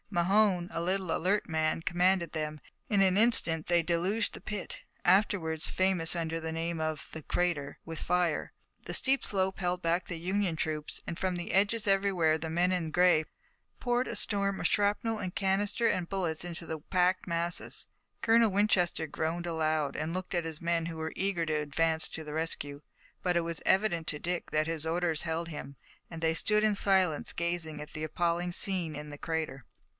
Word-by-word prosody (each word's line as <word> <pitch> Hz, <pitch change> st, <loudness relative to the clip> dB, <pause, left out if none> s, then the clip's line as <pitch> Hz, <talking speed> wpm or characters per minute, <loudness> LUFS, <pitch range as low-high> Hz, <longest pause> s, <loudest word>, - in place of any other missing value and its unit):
Mahone, 190 Hz, 0 st, +3 dB
a 165 Hz, -, -2 dB
little, 185 Hz, 0 st, 0 dB
alert 195 Hz, +4 st, +1 dB
man, 160 Hz, 0 st, 0 dB
commanded 180 Hz, +1 st, +2 dB
them, 155 Hz, -1 st, -3 dB, 0.3 s
and 205 Hz, -2 st, +3 dB
in -, -, +6 dB
an 190 Hz, +3 st, +3 dB
instant 165 Hz, -9 st, +2 dB
they 175 Hz, -1 st, +3 dB
deluged 180 Hz, +7 st, 0 dB
the -, -, -9 dB
pit, 210 Hz, -3 st, -5 dB, 0.3 s
afterward 175 Hz, -4 st, +3 dB
famous 185 Hz, -2 st, +1 dB
under 165 Hz, -1 st, -2 dB
the 160 Hz, 0 st, -4 dB
name 165 Hz, 0 st, -2 dB
of 155 Hz, -1 st, -3 dB
"The 160 Hz, -, -6 dB
Crater," 165 Hz, -6 st, -1 dB
with 165 Hz, -1 st, -6 dB
fire. 180 Hz, -1 st, 0 dB, 0.3 s
The -, -, -2 dB
steep 270 Hz, 0 st, +3 dB
slope 190 Hz, -1 st, 0 dB
held 180 Hz, -1 st, -1 dB
back 170 Hz, +1 st, 0 dB
the 175 Hz, -, -4 dB
Union 185 Hz, 0 st, 0 dB
troops 155 Hz, -1 st, -3 dB
and 170 Hz, -, -4 dB
from 185 Hz, -1 st, -1 dB
the 175 Hz, 0 st, -4 dB
edges 205 Hz, +3 st, +2 dB
everywhere 195 Hz, -5 st, +3 dB
the 160 Hz, +1 st, -5 dB
men 175 Hz, +3 st, +2 dB
in 170 Hz, -3 st, -1 dB
gray 175 Hz, -2 st, +4 dB, 0.5 s
poured 245 Hz, +1 st, +1 dB
a -, -, -4 dB
storm 200 Hz, -1 st, +1 dB
of -, -, +2 dB
shrapnel 210 Hz, +2 st, +1 dB
and 185 Hz, -3 st, -4 dB
canister 205 Hz, +4 st, +1 dB
and 175 Hz, -2 st, 0 dB
bullets 175 Hz, -5 st, -1 dB
into 170 Hz, -1 st, -5 dB
the 160 Hz, -1 st, -4 dB
packed 180 Hz, +3 st, +1 dB
masses. 170 Hz, 0 st, -1 dB, 0.3 s
Colonel 230 Hz, 0 st, +5 dB
Winchester 190 Hz, -5 st, +2 dB
groaned 165 Hz, +3 st, -2 dB
aloud, 155 Hz, -4 st, 0 dB
and 155 Hz, +2 st, -2 dB
looked 185 Hz, +1 st, -4 dB
at 175 Hz, -2 st, 0 dB
his 160 Hz, -1 st, -5 dB
men 170 Hz, -1 st, 0 dB
who 165 Hz, -1 st, -6 dB
were 160 Hz, 0 st, -4 dB
eager 190 Hz, -3 st, 0 dB
to 160 Hz, -, -1 dB
advance 160 Hz, +2 st, +2 dB
to 160 Hz, -, -6 dB
the 150 Hz, -, -6 dB
rescue, 145 Hz, -3 st, -3 dB, 0.4 s
but 180 Hz, -1 st, +1 dB
it -, -, +3 dB
was 165 Hz, -1 st, -4 dB
evident 190 Hz, -5 st, +2 dB
to 150 Hz, -, -2 dB
Dick 175 Hz, +2 st, -3 dB
that 155 Hz, 0 st, +1 dB
his 165 Hz, -1 st, -2 dB
orders 165 Hz, -1 st, 0 dB
held 165 Hz, 0 st, -2 dB
him, 145 Hz, -3 st, -7 dB, 0.3 s
and 165 Hz, -1 st, -8 dB
they 160 Hz, 0 st, +2 dB
stood 210 Hz, +6 st, +2 dB
in 210 Hz, -1 st, +3 dB
silence 190 Hz, -6 st, +2 dB
gazing 170 Hz, -3 st, -2 dB
at 150 Hz, +1 st, -9 dB
the 155 Hz, -, -5 dB
appalling 175 Hz, +2 st, 0 dB
scene 175 Hz, -3 st, +1 dB
in 150 Hz, +1 st, -7 dB
the 145 Hz, -, -8 dB
crater. 155 Hz, -4 st, -3 dB
170 Hz, 190 wpm, -30 LUFS, 160-190 Hz, 0.5 s, in